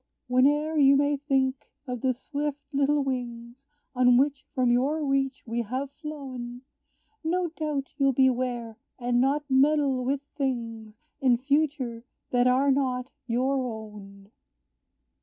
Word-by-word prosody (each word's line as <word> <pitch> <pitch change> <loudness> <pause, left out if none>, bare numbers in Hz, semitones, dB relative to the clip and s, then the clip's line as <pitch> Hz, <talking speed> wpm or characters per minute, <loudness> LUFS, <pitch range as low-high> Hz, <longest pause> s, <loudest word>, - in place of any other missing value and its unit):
"Whene'er 295 +5 +3
you 275 -1 +7
may 290 +1 +2
think 270 -2 -1 0.2
of 250 -3 -5
the 260 - +2
swift 285 +3 -3 0.2
little 285 +1 +2
wings 245 0 -5 0.3
On 250 -1 +5
which 275 +1 +1
from 250 -2 +3
your 285 +6 +1
reach 275 0 0
we 235 0 -2
have 260 +5 -4
flown, 265 -5 -7 0.6
No 350 +2 0
doubt, 300 -4 -3
you'll 275 -2 +3
beware, 245 -3 0 0.2
and 245 -1 +1
not 280 +3 +2
meddle 275 -1 +3
with 270 +2 -1
things, 230 -6 -4 0.2
In 255 -3 +4
future, 270 -3 0 0.3
that 245 0 +3
are 265 +3 +4
not 260 -2 0 0.2
your 260 +3 +1
own." 210 -4 -8
265 Hz, 130 wpm, -27 LUFS, 245-280 Hz, 0.6 s, you